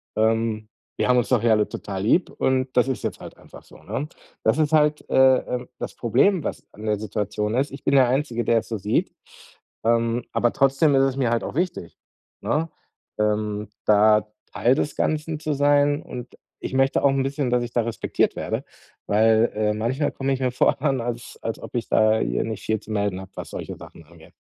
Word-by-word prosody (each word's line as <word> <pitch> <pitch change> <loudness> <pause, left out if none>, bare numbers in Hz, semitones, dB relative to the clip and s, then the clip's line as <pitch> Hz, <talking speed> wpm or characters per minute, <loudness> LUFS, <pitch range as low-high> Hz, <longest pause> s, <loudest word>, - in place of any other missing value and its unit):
Ähm, 110 -1 0 0.3
wir - - +1
haben 125 0 +4
uns 120 - +1
doch 125 -4 +3
ja 120 - +4
alle 105 -1 +2
total 95 -1 -5
lieb 165 - +2
und 130 0 0
das 125 - +4
ist 130 - -3
jetzt - - -3
halt - - -11
einfach - - -15
so“, - - -17
ne? 145 - -4 0.4
Das 110 +5 +3
ist 155 0 +1
halt, 150 -1 +2
äh, 130 -1 +6
ähm 125 0 -5
das - - -5
Problem, 140 - +2
was - - -5
an 105 - -10
der 105 -1 +1
Situation 105 +1 -2
ist: 135 +3 0
ich 140 - -10
bin 140 - +2
der 130 -2 +6
Einzige, 125 -2 0
der 115 -1 +3
es - - -10
so 115 - -2
sieht, 105 +2 0 0.7
ähm, 115 +1 +1
aber 120 - +1
trotzdem 135 +2 +3
ist 135 - +4
es 135 -1 0
mir 125 -4 +1
halt 120 - 0
auch - - -6
wichtig, 170 - -3 0.4
ne, 160 +2 -1 0.5
ähm, 105 0 -1 0.2
da 105 0 +4 0.3
Teil 125 +3 +3
des 150 - -2
Ganzen 155 0 -1
zu 155 0 -2
sein 145 0 +3
und 125 0 -9 0.2
ich - - -6
möchte 135 +1 +2
auch 140 - +6
'n 135 -1 +1
bisschen, 135 -1 -1
dass 125 0 +2
ich 120 0 -7
da 120 - +2
respektiert 115 0 -1
werde. - - -3 0.4
Weil, 110 +2 +4
äh, 105 0 +1
manchmal 120 +7 -1
komme 135 0 -2
ich 130 - -2
mir 130 -1 +1
vor 125 - +2
dann, 135 -3 0
als 120 0 -6
als 115 - -3
ob - - -10
ich 120 - -2
da 110 0 +4
hier - - 0
nicht 110 -2 -5
viel 110 0 0
zu 110 - -11
melden 100 -3 -1
habe, 95 0 -12
was - - -7
solche - - -6
Sachen 85 - -13
angeht. 80 0 -18
120 Hz, 215 wpm, -23 LUFS, 110-135 Hz, 0.7 s, äh